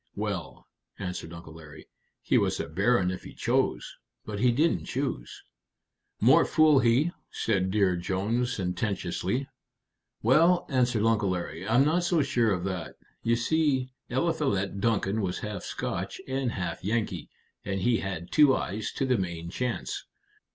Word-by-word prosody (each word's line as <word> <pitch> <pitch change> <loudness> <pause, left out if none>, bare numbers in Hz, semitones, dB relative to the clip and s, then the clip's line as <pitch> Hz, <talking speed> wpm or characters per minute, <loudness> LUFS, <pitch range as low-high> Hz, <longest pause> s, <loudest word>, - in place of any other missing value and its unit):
"Well," - - -4 0.3
answered 90 -3 -5
Uncle 85 -1 -10
Larry, 80 -2 -13 0.4
"he - - +1
was - - 0
a - - -3
baron 95 +3 +2
if 90 - -5
he - - -11
chose. - - 0 0.3
But 105 -2 -5
he 125 +2 +4
didn't 155 +8 +1
choose." 130 - -4 0.8
"More 135 +9 +6
fool 155 -3 +5
he!" 130 +8 +3 0.2
said 95 -4 0
Dear 95 -2 +2
Jones, 100 +8 -1
sententiously. 95 +5 -2 0.8
"Well," 165 +9 +4
answered 125 -5 +2
Uncle 110 -3 +2
Larry, 90 0 -4
"I'm 120 +5 +4
not 170 +4 +2
so 170 -3 +2
sure 120 -5 +2
of 90 -3 -1
that. 95 -3 -4 0.3
You 115 0 +2
see, 130 0 +1 0.2
Eliphalet 130 - 0
Duncan 110 -1 +1
was 90 -3 -2
half 105 -2 -4
Scotch - - -4
and 130 -2 -1
half 90 0 -4
Yankee, 105 -5 -2 0.3
and 95 -1 -2
he 115 +4 +3
had 95 -4 -5
two 145 -3 +6
eyes 105 +3 -3
to 135 - -1
the 125 -4 +2
main 85 -2 -4
chance. 125 +4 -3
110 Hz, 150 wpm, -28 LUFS, 95-130 Hz, 0.8 s, More